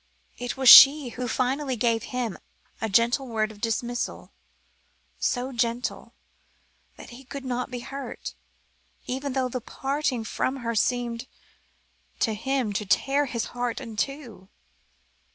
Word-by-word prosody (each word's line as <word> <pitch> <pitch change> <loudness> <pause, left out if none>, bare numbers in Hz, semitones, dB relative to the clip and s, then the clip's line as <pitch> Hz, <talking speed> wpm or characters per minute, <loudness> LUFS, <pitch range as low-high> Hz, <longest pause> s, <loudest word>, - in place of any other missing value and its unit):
It 245 +2 -4
was 265 -1 0
she 275 +2 +10
who 250 +1 -5
finally 260 +3 -1
gave 230 -1 0
him 245 -5 -4 0.4
a 225 - -1
gentle 235 +6 +2
word 220 -2 -1
of 205 -1 -15
dismissal, 235 +1 -3 0.9
so 250 +1 -1
gentle, 235 0 -2 0.8
that - - -12
he 250 +3 -12
could 275 +1 -8
not 250 0 -2
be 250 -1 -6
hurt, 275 +2 -7 0.7
even 265 +2 -3
though 260 -1 0
the 250 0 -4
parting 270 -1 -2
from 260 +4 -2
her 230 - -1
seemed 240 +1 -1 0.9
to 220 - +1
him 250 0 -1
to 210 +1 -2
tear 280 +7 +2
his 235 -2 -3
heart 245 -1 -2
in 230 -5 -8
two. 235 -6 -5
245 Hz, 135 wpm, -26 LUFS, 230-265 Hz, 0.9 s, she